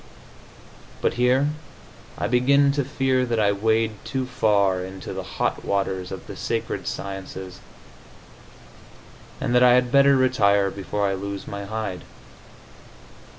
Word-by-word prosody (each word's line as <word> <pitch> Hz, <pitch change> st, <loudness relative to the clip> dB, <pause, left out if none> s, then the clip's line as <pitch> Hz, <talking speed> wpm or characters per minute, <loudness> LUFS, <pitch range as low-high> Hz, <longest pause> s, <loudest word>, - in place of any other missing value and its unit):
But -, -, 0 dB
here 125 Hz, +4 st, +2 dB, 0.7 s
I -, -, -2 dB
begin 140 Hz, +4 st, +4 dB
to 140 Hz, 0 st, 0 dB
fear 130 Hz, -1 st, 0 dB
that 120 Hz, -2 st, -1 dB
I 100 Hz, -1 st, +3 dB
wade 110 Hz, +1 st, 0 dB
too 130 Hz, -1 st, -3 dB
far 100 Hz, -6 st, +1 dB
into 95 Hz, 0 st, -7 dB
the -, -, -4 dB, 0.2 s
hot -, -, -1 dB
waters 95 Hz, -2 st, -2 dB
of 95 Hz, -, -7 dB
the -, -, -8 dB
sacred -, -, -3 dB
sciences, 95 Hz, -2 st, -6 dB, 1.8 s
and -, -, -1 dB
that 125 Hz, -, +5 dB
I 125 Hz, -1 st, +7 dB
had 125 Hz, -1 st, +2 dB
better 140 Hz, 0 st, +6 dB
retire 100 Hz, -7 st, +3 dB
before 100 Hz, +1 st, -2 dB
I 95 Hz, -, 0 dB
lose 100 Hz, +1 st, -5 dB
my 100 Hz, 0 st, -6 dB
hide. 105 Hz, -3 st, -4 dB
110 Hz, 135 wpm, -23 LUFS, 100-125 Hz, 1.8 s, I